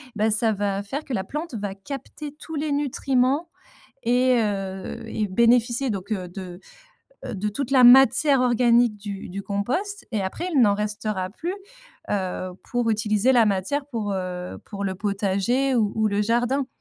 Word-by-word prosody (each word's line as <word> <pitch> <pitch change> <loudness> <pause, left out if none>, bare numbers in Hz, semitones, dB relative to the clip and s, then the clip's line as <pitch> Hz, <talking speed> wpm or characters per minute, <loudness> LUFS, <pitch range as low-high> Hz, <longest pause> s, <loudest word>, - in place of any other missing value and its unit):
bah, 215 +1 +2
ça 220 +1 +3
va 200 0 -2
faire 275 +9 -4
que 270 - -5
la 190 -5 -1
plante 300 - -5
va 200 -2 -4
capter 280 +6 -8
tous 320 - -8
les 300 0 -2
nutriments 275 +2 0 0.6
et 250 +1 +3
heu, 195 +2 -3
et 215 -1 -1
bénéficier 235 +4 +3
donc, 200 +2 -4
heu, 185 -3 -3
de, 180 -1 -8 0.7
heu, 245 - -5
de 205 +2 -2
toute 260 +5 -4
la 260 -2 +6
matière 270 +2 +7
organique 240 -2 +3
du 200 -1 -7
du 195 +2 -6
compost 305 - -2
et 210 - 0
après, 265 - -3
il 285 - +4
n'en 205 -4 +5
restera 210 -2 -2
plus, 340 - -4 0.6
heu, 185 -2 -2 0.2
pour 245 -2 0
utiliser 215 +3 +2
la 235 -3 +5
matière 205 +9 0
pour, 225 -7 -3
heu, 180 -1 -4
pour 200 -1 -6
le 190 -1 -1
potager 205 +7 0
ou 215 -4 +2
ou 220 0 +2
le 205 0 0
jardin, 245 +5 +1
220 Hz, 170 wpm, -24 LUFS, 200-260 Hz, 0.7 s, matière